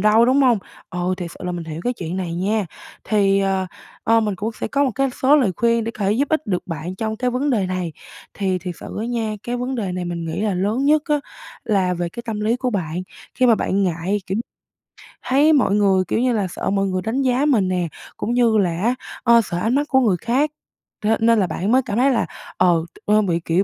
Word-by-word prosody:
đâu", 215 Hz, +3 st, +5 dB
đúng 260 Hz, +3 st, +3 dB
hông? 245 Hz, -4 st, +4 dB, 0.3 s
Ồ, 180 Hz, 0 st, -1 dB
thiệt 175 Hz, -2 st, -6 dB
sự -, -, -8 dB
là 180 Hz, -, -2 dB
mình 175 Hz, -1 st, -5 dB
hiểu 160 Hz, 0 st, -6 dB
cái 245 Hz, -, +1 dB
chuyện 180 Hz, -5 st, -5 dB
này 175 Hz, -3 st, -3 dB
nha. 200 Hz, +3 st, 0 dB, 0.4 s
Thì, 200 Hz, -2 st, +3 dB
ờ, 190 Hz, -1 st, 0 dB, 0.4 s
ơ, 225 Hz, 0 st, +4 dB
mình 210 Hz, -2 st, -1 dB
cũng 215 Hz, +4 st, -2 dB
sẽ -, -, -1 dB
có 285 Hz, 0 st, +2 dB
một 265 Hz, -, +1 dB
cái 275 Hz, 0 st, +1 dB
số 285 Hz, +3 st, +6 dB
lời 240 Hz, -10 st, +2 dB
khuyên 235 Hz, -1 st, +2 dB
để 230 Hz, -, -2 dB
có 210 Hz, -3 st, -5 dB
thể 200 Hz, -, +3 dB
giúp 275 Hz, +5 st, +1 dB
ích 315 Hz, -1 st, 0 dB
được 180 Hz, -3 st, -2 dB
bạn 165 Hz, +1 st, -5 dB
trong 220 Hz, +1 st, -2 dB
cái 250 Hz, +1 st, 0 dB
vấn 270 Hz, +4 st, 0 dB
đề 205 Hz, -7 st, +1 dB
này. 180 Hz, -3 st, -3 dB, 0.4 s
Thì 190 Hz, -2 st, 0 dB
thiệt 180 Hz, 0 st, -6 dB
sự -, -, -8 dB
á 225 Hz, -, -2 dB
nha, 230 Hz, -3 st, -2 dB
cái 245 Hz, +1 st, -3 dB
vấn 250 Hz, +2 st, -3 dB
đề 200 Hz, -6 st, -2 dB
này 180 Hz, -1 st, -3 dB
mình 170 Hz, -1 st, -4 dB
nghĩ 160 Hz, +3 st, -3 dB
là 210 Hz, -3 st, 0 dB
lớn 210 Hz, +8 st, 0 dB
nhất 300 Hz, +1 st, +4 dB
á 295 Hz, -1 st, +2 dB, 0.4 s
là 190 Hz, -4 st, +1 dB
về 175 Hz, 0 st, -2 dB
cái 235 Hz, +7 st, -8 dB
tâm 215 Hz, -2 st, -3 dB
lý 220 Hz, +3 st, +1 dB
của 250 Hz, 0 st, -1 dB
bạn, 180 Hz, -4 st, -2 dB, 0.3 s
khi 255 Hz, -, +3 dB
mà 230 Hz, -, +6 dB
bạn 200 Hz, -1 st, 0 dB
ngại, 180 Hz, +2 st, 0 dB
kiểu, 190 Hz, +3 st, -1 dB, 0.9 s
thấy 290 Hz, +4 st, +4 dB
mọi 250 Hz, -8 st, +3 dB
người, 195 Hz, -2 st, +3 dB
kiểu -, -, 0 dB
như 250 Hz, 0 st, +2 dB
là, 205 Hz, -4 st, 0 dB
sợ -, -, -3 dB
mọi 195 Hz, 0 st, +1 dB
người 185 Hz, -1 st, -1 dB
đánh 225 Hz, +7 st, -1 dB
giá 260 Hz, +1 st, +2 dB
mình 225 Hz, -11 st, +3 dB
nè, 180 Hz, -2 st, 0 dB, 0.3 s
cũng 235 Hz, -, -2 dB
như 235 Hz, -3 st, +3 dB
là 180 Hz, -3 st, +1 dB
á, 240 Hz, +3 st, +2 dB, 0.3 s
ơ, 235 Hz, -1 st, +6 dB
sợ 175 Hz, -, -4 dB
ánh 225 Hz, +8 st, +1 dB
mắt 290 Hz, +1 st, +1 dB
của 265 Hz, -, +4 dB
người 210 Hz, -8 st, +2 dB
khác, 270 Hz, +6 st, +1 dB, 0.5 s
thế 220 Hz, +1 st, +3 dB
nên 230 Hz, 0 st, +4 dB
là 190 Hz, -, +2 dB
bạn 185 Hz, +6 st, -2 dB
mới 260 Hz, +2 st, +5 dB
cảm 205 Hz, -, -2 dB
thấy 270 Hz, +2 st, +4 dB
là, 235 Hz, -, +1 dB, 0.3 s
ờ, 170 Hz, -2 st, +3 dB, 0.2 s
ơ, 210 Hz, +1 st, +4 dB
bị, 175 Hz, -5 st, 0 dB
kiểu, 170 Hz, +4 st, +2 dB
210 Hz, 255 wpm, -21 LUFS, 185-245 Hz, 0.9 s, số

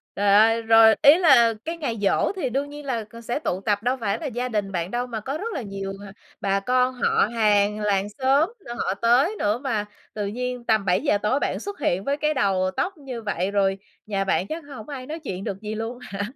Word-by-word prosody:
Trời 200 Hz, 0 st, +3 dB
ơi! 225 Hz, +2 st, +5 dB
Rồi 225 Hz, -1 st, +6 dB
ý 295 Hz, +3 st, +8 dB
là 240 Hz, -10 st, +5 dB
cái 335 Hz, +1 st, -4 dB
ngày 260 Hz, -8 st, -3 dB
giỗ 195 Hz, -, +2 dB
thì 285 Hz, -9 st, -2 dB
đương 280 Hz, +3 st, -2 dB
nhiên 295 Hz, 0 st, -9 dB
là 235 Hz, -5 st, -2 dB
c 230 Hz, +2 st, -13 dB
sẽ 240 Hz, +5 st, -2 dB
tụ 190 Hz, -10 st, -2 dB
tập, 205 Hz, +1 st, 0 dB
đâu 255 Hz, +2 st, +1 dB
phải 200 Hz, -2 st, -1 dB
là 320 Hz, -, -6 dB
gia 250 Hz, 0 st, -3 dB
đình 205 Hz, -3 st, -2 dB
bạn 175 Hz, 0 st, -3 dB
đâu, 245 Hz, +1 st, -2 dB
mà 225 Hz, -2 st, -4 dB
có 275 Hz, +6 st, -4 dB
rất 450 Hz, +5 st, -5 dB
là 275 Hz, -, -3 dB
nhiều, 195 Hz, -2 st, -5 dB
à, -, -, -10 dB, 0.3 s
bà 195 Hz, 0 st, +1 dB
con, 250 Hz, +4 st, +1 dB
họ 245 Hz, -4 st, +2 dB
hàng, 210 Hz, -1 st, +3 dB
làng 205 Hz, -1 st, 0 dB
xóm 275 Hz, +7 st, +3 dB, 0.2 s
nữa, 240 Hz, -, -6 dB
họ 185 Hz, -, 0 dB
tới 250 Hz, -, +2 dB
nữa 210 Hz, +3 st, +1 dB
mà 225 Hz, -7 st, -2 dB, 0.3 s
tự 210 Hz, -1 st, -3 dB
nhiên 250 Hz, +2 st, -4 dB
tầm 215 Hz, -3 st, +2 dB
7:00 205 Hz, -, +2 dB
tối 210 Hz, +7 st, 0 dB
bạn -, -, -2 dB
xuất 405 Hz, -3 st, -7 dB
hiện 190 Hz, -7 st, 0 dB
với 280 Hz, +1 st, -1 dB
cái 305 Hz, +1 st, 0 dB
đầu 190 Hz, -7 st, +1 dB
tóc 370 Hz, -1 st, -1 dB
như 260 Hz, -5 st, -7 dB
vậy, 195 Hz, -2 st, -2 dB
rồi 195 Hz, -1 st, +1 dB, 0.3 s
nhà 200 Hz, -2 st, -1 dB
bạn 190 Hz, 0 st, 0 dB
chắc 320 Hz, 0 st, -5 dB
hổng 220 Hz, +5 st, -10 dB
ai 260 Hz, -3 st, -6 dB
nói 315 Hz, +3 st, -6 dB
chuyện 190 Hz, -5 st, -5 dB
được 195 Hz, +1 st, -5 dB
gì 215 Hz, 0 st, -5 dB
luôn 230 Hz, +3 st, -5 dB
hả? 200 Hz, -4 st, -6 dB
225 Hz, 240 wpm, -24 LUFS, 200-265 Hz, 0.3 s, ý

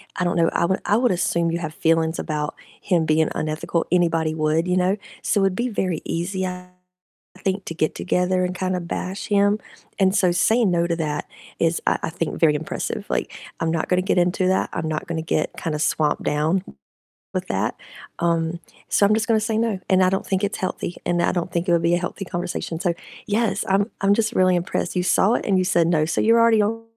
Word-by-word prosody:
I 180 Hz, -, -1 dB
don't 175 Hz, -, 0 dB
know, 165 Hz, -1 st, +4 dB
I -, -, +1 dB
would 190 Hz, +2 st, 0 dB
I 205 Hz, -, +3 dB
would 245 Hz, +1 st, +2 dB
assume 170 Hz, -1 st, +1 dB
you 170 Hz, -, -1 dB
have 155 Hz, -2 st, -5 dB
feelings 165 Hz, 0 st, +1 dB
about 150 Hz, -1 st, -3 dB, 0.3 s
him 170 Hz, -4 st, +1 dB
being 155 Hz, 0 st, +2 dB
unethical, 155 Hz, +2 st, -1 dB
anybody 165 Hz, -3 st, +2 dB
would, 155 Hz, +1 st, +1 dB
you 180 Hz, 0 st, +1 dB
know, 185 Hz, +2 st, +2 dB, 0.3 s
so 205 Hz, -, +1 dB
it'd 195 Hz, -1 st, +2 dB
be 240 Hz, -, 0 dB
very 185 Hz, -7 st, -2 dB
easy, 190 Hz, +3 st, -2 dB
I 180 Hz, 0 st, -7 dB, 0.8 s
think, 190 Hz, 0 st, -1 dB
to 165 Hz, -, -5 dB
get 155 Hz, -1 st, 0 dB
together 180 Hz, 0 st, 0 dB
and 180 Hz, 0 st, -2 dB
kind 185 Hz, 0 st, -1 dB
of 175 Hz, -1 st, -5 dB
bash 190 Hz, +3 st, -4 dB
him, 205 Hz, 0 st, +3 dB, 0.4 s
and 190 Hz, -1 st, +3 dB
so 185 Hz, -4 st, +3 dB
saying 220 Hz, +4 st, +3 dB
no 170 Hz, -1 st, +2 dB
to 170 Hz, -, 0 dB
that 150 Hz, -2 st, -2 dB, 0.3 s
is, 165 Hz, 0 st, +1 dB
I -, -, +2 dB
I -, -, -1 dB
think 165 Hz, -1 st, -3 dB
very 155 Hz, -3 st, +5 dB
impressive, 155 Hz, +1 st, -4 dB
like, -, -, -1 dB, 0.3 s
"I'm 165 Hz, -, 0 dB
not 165 Hz, -1 st, -1 dB
gonna 180 Hz, 0 st, +2 dB
get 190 Hz, 0 st, +1 dB
into 180 Hz, +1 st, +2 dB
that, 190 Hz, -, +1 dB
I'm 160 Hz, -1 st, -3 dB
not 155 Hz, -1 st, -3 dB
gonna 165 Hz, -1 st, -2 dB
get 155 Hz, -1 st, -1 dB
kinda 155 Hz, -2 st, -2 dB
swamped 150 Hz, -1 st, +1 dB
down 155 Hz, +5 st, +1 dB, 0.7 s
with -, -, -3 dB
that, -, -, -1 dB, 0.4 s
um, 170 Hz, 0 st, 0 dB, 0.3 s
so 200 Hz, -, +4 dB
I'm 205 Hz, -, +4 dB
just 225 Hz, +1 st, -1 dB
gonna 225 Hz, -2 st, +3 dB
say 220 Hz, 0 st, -1 dB
no, 225 Hz, -4 st, 0 dB
and 185 Hz, 0 st, +5 dB
I 185 Hz, -, +4 dB
don't 190 Hz, +1 st, -1 dB
think 190 Hz, +1 st, 0 dB
it's 205 Hz, -, -1 dB
healthy, 180 Hz, -2 st, -3 dB
and 175 Hz, 0 st, +1 dB
I -, -, +2 dB
don't 175 Hz, 0 st, -2 dB
think 170 Hz, +2 st, -1 dB
it -, -, +4 dB
would 170 Hz, -, +3 dB
be 170 Hz, +1 st, +3 dB
a -, -, +1 dB
healthy 185 Hz, +2 st, -5 dB
conversation," 175 Hz, -2 st, -4 dB
so 175 Hz, -2 st, +1 dB, 0.3 s
yes, 220 Hz, +1 st, 0 dB
I'm 200 Hz, +3 st, +2 dB
I'm 195 Hz, +1 st, +4 dB
just 225 Hz, +1 st, 0 dB
really 185 Hz, -3 st, +4 dB
impressed, 175 Hz, +1 st, -2 dB
you 180 Hz, -, +1 dB
saw 195 Hz, +4 st, +3 dB
it -, -, -2 dB
and 195 Hz, -2 st, +2 dB
you 185 Hz, -, +1 dB
said 170 Hz, -2 st, +3 dB
no, 160 Hz, -3 st, +2 dB
so 160 Hz, -, 0 dB
you're 230 Hz, +1 st, +5 dB
already 230 Hz, -2 st, +5 dB
on 225 Hz, +2 st, -2 dB
180 Hz, 230 wpm, -22 LUFS, 165-195 Hz, 0.8 s, very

